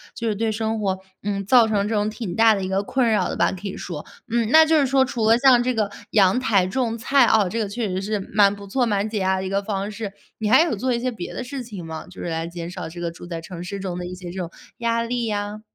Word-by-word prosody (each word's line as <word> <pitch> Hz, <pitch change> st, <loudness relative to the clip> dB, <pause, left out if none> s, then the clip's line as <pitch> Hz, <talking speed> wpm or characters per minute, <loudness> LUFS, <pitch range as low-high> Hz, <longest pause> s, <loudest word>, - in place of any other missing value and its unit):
就 230 Hz, -, -3 dB
是 210 Hz, -, 0 dB
对 220 Hz, +1 st, 0 dB
生 220 Hz, 0 st, -2 dB
活， 190 Hz, -2 st, 0 dB, 0.3 s
嗯， 200 Hz, -1 st, -2 dB
造 235 Hz, 0 st, +6 dB
成 205 Hz, -1 st, +1 dB
这 225 Hz, -, -2 dB
种 210 Hz, 0 st, +1 dB
挺 215 Hz, -5 st, -5 dB
大 225 Hz, -1 st, +5 dB
的 195 Hz, -, -3 dB
一 -, -, -2 dB
个 190 Hz, +1 st, 0 dB
困 255 Hz, +2 st, +1 dB
扰 215 Hz, -, +1 dB
的 -, -, -3 dB
吧， -, -, +3 dB
可 190 Hz, +2 st, -6 dB
以 190 Hz, -, -6 dB
说。 160 Hz, -4 st, -6 dB, 0.3 s
嗯， 230 Hz, -2 st, +1 dB
那 315 Hz, 0 st, +8 dB
就 315 Hz, -1 st, +4 dB
是 275 Hz, -, +3 dB
说 265 Hz, 0 st, +3 dB
除 225 Hz, -3 st, 0 dB
了 230 Hz, -, +6 dB
像 250 Hz, -2 st, +6 dB
这 250 Hz, +1 st, 0 dB
个 210 Hz, -2 st, 0 dB, 0.2 s
阳 200 Hz, +3 st, +4 dB
台 205 Hz, -8 st, +2 dB
种 230 Hz, +3 st, -1 dB
菜 270 Hz, +3 st, +4 dB
啊， 215 Hz, -4 st, +4 dB
这 230 Hz, +5 st, -3 dB
个 210 Hz, -3 st, -1 dB
确 225 Hz, +1 st, -2 dB
实 185 Hz, 0 st, -2 dB
是 210 Hz, +1 st, -2 dB
蛮 205 Hz, -1 st, +5 dB
不 200 Hz, 0 st, -10 dB
错， 250 Hz, +6 st, 0 dB
蛮 205 Hz, -1 st, 0 dB
解 215 Hz, -1 st, -3 dB
压 190 Hz, 0 st, +1 dB
的 190 Hz, -, -3 dB
一 -, -, -3 dB
个 200 Hz, +1 st, 0 dB
方 200 Hz, 0 st, -3 dB
式， 205 Hz, -1 st, -5 dB, 0.3 s
你 215 Hz, -1 st, -1 dB
还 260 Hz, +7 st, +7 dB
有 310 Hz, -10 st, -1 dB
做 255 Hz, +5 st, -1 dB
一 235 Hz, -, 0 dB
些 255 Hz, +1 st, -1 dB
别 195 Hz, -6 st, -7 dB
的 255 Hz, -, -3 dB
事 265 Hz, +1 st, -6 dB
情 205 Hz, -7 st, -8 dB
吗？ 160 Hz, -1 st, -7 dB
就 180 Hz, -, -13 dB
是 175 Hz, -, -3 dB
来 165 Hz, 0 st, -2 dB
减 170 Hz, 0 st, -6 dB
少 185 Hz, -3 st, -6 dB
这 175 Hz, +1 st, -9 dB
个 170 Hz, -1 st, -2 dB
住 175 Hz, +1 st, -11 dB
在 165 Hz, -2 st, -5 dB
城 175 Hz, +1 st, -8 dB
市 195 Hz, +2 st, -5 dB
中 185 Hz, -2 st, -4 dB
的 180 Hz, -, -5 dB
一 180 Hz, -, -6 dB
些 180 Hz, -1 st, -8 dB
这 190 Hz, -, -9 dB
种 170 Hz, -2 st, -3 dB, 0.3 s
压 230 Hz, 0 st, +1 dB
力 240 Hz, 0 st, -2 dB
呀？ 205 Hz, 0 st, -3 dB
210 Hz, 320 characters per minute, -23 LUFS, 190-230 Hz, 0.3 s, 那